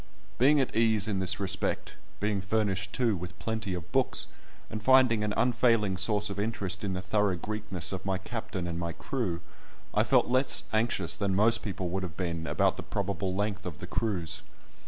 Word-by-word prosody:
Being 145 +4 +6
at 130 - 0
ease 110 -2 +3
in 100 -3 0
this 95 +1 +1
respect, 100 -1 -1 0.3
being 105 -1 0
furnished 100 -1 0
too 120 -5 +1
with 90 0 -7
plenty 105 +1 -2
of 85 -3 -7
books, - - +2 0.4
and 110 - -5
finding 125 -2 +5
an 105 - 0
unfailing 115 -4 +3
source 105 +2 +1
of 100 - -4
interest 105 -3 -1
in 100 -2 -1
the 90 0 -3
thorough 100 -1 +2
Greekness 105 -2 -4
of 95 0 -4
my 95 -1 0
captain 110 -2 -5
and 85 -1 -3
my 85 -1 -3
crew, 90 -7 -2 0.5
I - - +4
felt - - +4
less 130 +2 +1
anxious 110 -6 +1
than 100 -2 0
most 110 +3 +4
people 95 -4 -3
would 95 +2 -2
have 85 -4 -6
been 85 -3 -2
about - - +2
the - - -4
probable 95 -1 -2
length 100 -1 -1
of 85 -7 -6
the - - -7
cruise. 100 -7 -1
100 Hz, 190 wpm, -29 LUFS, 95-110 Hz, 0.5 s, Being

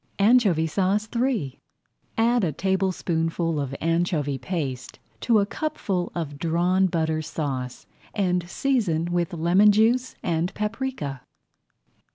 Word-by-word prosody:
ANCHOVY 200 -6 +4
SAUCE 195 +6 0
III 235 - -1 0.6
Add 235 0 +3
a 165 - +1
tablespoonful 170 -2 -1
of 140 -1 -3
anchovy 165 -4 0
paste 130 -4 -4 0.2
to 230 -2 +3
a 200 - +3
cupful 200 - -3
of 145 -4 -4
Drawn 175 +4 +2
Butter 160 -2 0
Sauce 135 -5 -4 0.3
and 180 -4 0
season 180 -11 0
with 175 -1 0
lemon 175 +5 +4
juice 235 +5 +2
and 170 +1 0
paprika. 210 - -3
175 Hz, 115 wpm, -24 LUFS, 160-210 Hz, 0.6 s, ANCHOVY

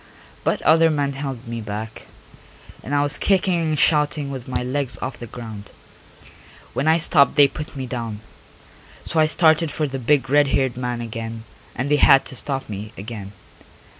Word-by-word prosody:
But - - -1
other 165 +1 +5
men 145 -2 -1
held 135 -3 -6
me 115 0 -5
back, 110 +1 -7 0.7
and 140 +5 -3
I 145 - +3
was 145 0 +2
kicking 185 -3 +2
and 155 -2 -1
shouting 150 -1 +2
with 130 -3 -7
my 125 -1 -1
legs 130 0 -2
off 130 - -5
the 120 - -7
ground. 110 -3 -9 1.0
When 145 - -1
I 160 +1 +5
stopped 150 -5 +3
they 145 -1 +7
put 150 +2 -8
me 135 -1 -4
down, 115 -4 -5 0.8
so 165 - -1
I 155 - +5
started 160 0 +4
for 150 0 -2
the 135 -1 -5
big 135 +3 +2
red 145 +1 +4
haired 135 -2 0
man 125 -1 -3
again 115 0 -6 0.3
and 130 - -2
they 150 - +5
had 135 -1 +6
to - - -2
stop 135 0 -3
me 105 +1 -7
again. 100 -1 -8
135 Hz, 180 wpm, -22 LUFS, 115-150 Hz, 1.0 s, they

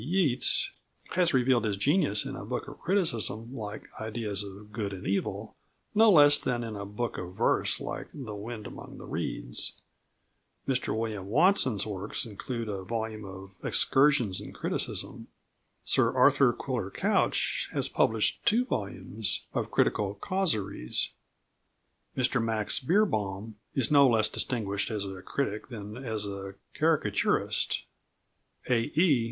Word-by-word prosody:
B. 120 - -8
Yeats 155 -8 +2 0.4
has 180 -2 +3
revealed 125 -1 +3
his 105 -3 -1
genius 140 - +3
in - - -5
a - - -7
book - - -4
of - - -10
criticism 120 - 0
like 105 -3 -6 0.2
Ideas 110 -2 -2
of 100 +1 -11
Good 105 -2 -3
and 95 - -8
Evil 100 +1 -2 0.4
no 220 +1 +6
less 145 -5 +8
than 120 -1 -1
in 110 -2 -5
a 100 -1 -6
book 115 +4 -3
of 90 0 -7
verse - - +2
like - - -5
The 125 -7 -7
Wind 105 +1 -7
among - - -9
the - - -10
Reeds; - - -2 0.9
Mr 130 -4 0
William 110 -4 -3
Watson's 130 - +3
works 105 +1 -2
include 115 +2 -5
a 100 -2 -4
volume 110 +1 -4
of 95 0 -10
Excursions 135 -8 +3
in - - -9
Criticism; - - -2 0.6
Sir - - +3
Arthur - - +5
Quiller - - -3
Couch - - +1
has - - +1
published 110 -1 +1
two 235 +4 +4
volumes 100 - -2
of - - -2
critical 100 -1 +1
causeries; 105 - 0 1.1
Mr 125 -2 +2
Max 110 -2 +1
Beerbohm 110 - 0 0.2
is 135 -1 +1
no 140 -2 +7
less 110 -3 +4
distinguished 105 -4 -1
as 105 -2 -2
a 95 -1 -7
critic 110 -2 -3
than 105 -3 -7
as 110 -5 -3
a 100 -1 -6 0.2
caricaturist; 155 -10 +1 0.8
"A. 125 - +3 0.2
E." 160 -8 +5
110 Hz, 140 wpm, -29 LUFS, 100-135 Hz, 1.1 s, less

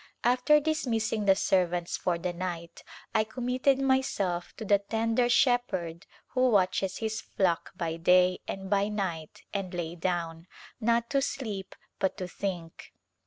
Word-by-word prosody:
After 250 +5 +4
dismissing 230 -9 -1
the 195 -1 +6
servants 180 -3 +1
for 175 -2 0
the 175 +1 -3
night 170 -2 -5 0.3
I 215 - +4
commit 250 +3 -4
ted 275 -2 +6
myself 260 -10 0
to 220 - -6
the 200 0 +4
tender 225 +4 0
Shepherd 205 -11 +1 0.2
who 255 0 +2
watches 195 -2 +2
His 220 0 -2
flock 175 -4 0
by 165 -1 -2
day 180 +2 +4
and 195 0 -5
by 200 +1 +2
night 185 -7 -4
and 195 -3 -3
lay 170 -1 -3
down, 170 -1 -3 0.3
not 235 0 +1
to 275 -1 +3
sleep 215 -9 -4 0.2
but 190 - 0
to 185 - -4
think. 180 -3 -6
195 Hz, 150 wpm, -29 LUFS, 175-235 Hz, 0.3 s, the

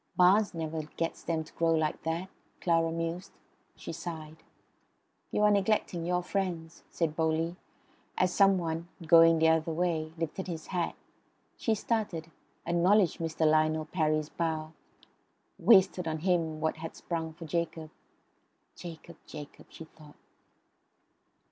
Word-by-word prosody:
"Barnes 190 +2 +5
never 160 -1 -3 0.2
gets 165 0 -2
them 160 -1 -1
to 155 - -17
grow 165 -1 +2
like 155 -1 -1
that," 165 +3 -2 0.3
Clara 165 -2 +2
mused; 165 +3 -4 0.4
she - - -7
sighed. 160 -2 -7 0.9
"You 210 - 0
are 210 - +6
neglecting 195 -4 +1
your 180 0 +1
friends," 180 -4 -3
said 160 -3 -1
Bowley, 160 +1 0 0.6
as 185 -1 +2
some 195 -1 +5
one, 165 -1 -3 0.2
going 165 0 +7
the 160 0 +4
other 160 0 +2
way, 160 -2 -1
lifted 165 +4 -4
his 165 -3 -5
hat. 175 -2 -1 0.6
She 225 - 0
started; 200 -8 -2 0.3
acknowledged 175 +2 +3
Mr. 160 -1 -1
Lionel 155 0 +3
Parry's 155 -2 0
bow; 160 -2 -3 0.9
wasted 190 -5 +5
on 160 0 -1
him 165 -3 +1
what 160 0 -1
had 165 0 -7
sprung 165 -2 -4
for 165 +1 -10
Jacob. 165 -1 -3 0.8
("Jacob! 170 -1 -10
Jacob!" 150 -2 -10
she 160 - -10
thought.) 155 -2 -17
165 Hz, 135 wpm, -30 LUFS, 160-180 Hz, 0.9 s, going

